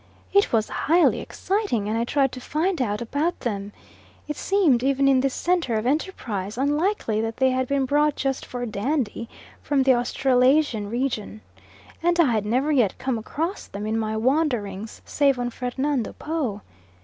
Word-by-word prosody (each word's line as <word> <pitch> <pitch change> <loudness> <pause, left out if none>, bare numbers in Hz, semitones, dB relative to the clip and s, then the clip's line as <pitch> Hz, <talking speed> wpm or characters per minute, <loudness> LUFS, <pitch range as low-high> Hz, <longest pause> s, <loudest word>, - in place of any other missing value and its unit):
It 400 +1 +4
was 220 -2 +2
highly 335 +3 +2
exciting, 385 - -2
and 215 - -1
I 230 +1 0
tried 270 +1 +1
to 255 - -8
find 325 +5 -1
out 210 -2 -1
about 295 +9 -1
them. 205 -4 -3 0.6
It 300 - -3
seemed, 340 -12 +2
even 275 +1 +2
in 270 -1 +5
this 270 0 0
centre 345 -9 0
of 215 +1 -1
enterprise, 240 - -2
unlikely 290 - 0
that 225 0 -3
they 260 -1 +3
had 255 0 0
been 280 0 +1
brought 295 +2 +2
just 270 -1 -2
"for 245 -1 -5
dandy" 230 +1 -2 0.3
from 280 -2 +1
the 260 0 +5
Australasian 250 -1 +2
region, 230 -3 -3 0.6
and 345 +1 +1
I 305 -7 +5
had 215 -2 0
never 260 +7 +1
yet 240 -10 +2
come 255 -3 -2
across 330 - -4
them 205 +1 -6
in 215 +1 -1
my 220 0 -2
wanderings 225 -6 -1
save 280 -2 +2
on 245 0 -2
Fernando 255 +1 -2
Po. 285 -10 -3
260 Hz, 170 wpm, -24 LUFS, 225-295 Hz, 0.6 s, in